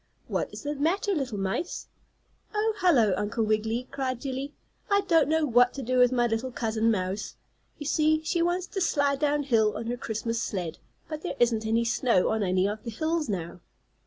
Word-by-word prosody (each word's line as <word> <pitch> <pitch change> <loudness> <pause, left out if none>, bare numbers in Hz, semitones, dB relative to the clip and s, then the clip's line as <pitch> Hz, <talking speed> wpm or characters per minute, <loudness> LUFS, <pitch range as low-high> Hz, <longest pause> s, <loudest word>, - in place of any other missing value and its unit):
"What - - -2
is - - -9
the 295 0 -2
matter, 340 +8 0
little 265 - -2
mice?" 195 - -3 0.7
"Oh, 435 +1 +1
hello. 255 - +4
Uncle 210 +3 -1
Wiggily!" 220 +3 0
cried 260 -3 -2
Jillie. 275 +2 -4 0.3
"I 400 0 +4
don't 330 -7 +3
know 320 0 +2
what 245 -1 +4
to 275 - -5
do 255 +1 +1
with 250 0 +6
my 240 -1 +2
little 230 +2 -1
cousin 225 -2 0
mouse. 190 -1 -2 0.4
You 295 - -7
see 310 +1 +2
she 335 +2 0
wants 350 +1 +1
to 385 +1 -4
slide 285 -5 +2
down 295 -1 +1
hill 225 -6 +2
on 230 - -5
her 240 +2 -2
Christmas 230 0 -3
sled, 175 -7 -3 0.3
but 310 -1 -5
there 360 - -4
isn't 225 -2 +2
any 230 +1 +2
snow 230 -4 +2
on 220 0 0
any 185 0 +2
of 210 +1 -4
the 240 - -5
hills 315 +5 -1
now." 175 -3 -4
250 Hz, 195 wpm, -27 LUFS, 220-305 Hz, 0.7 s, with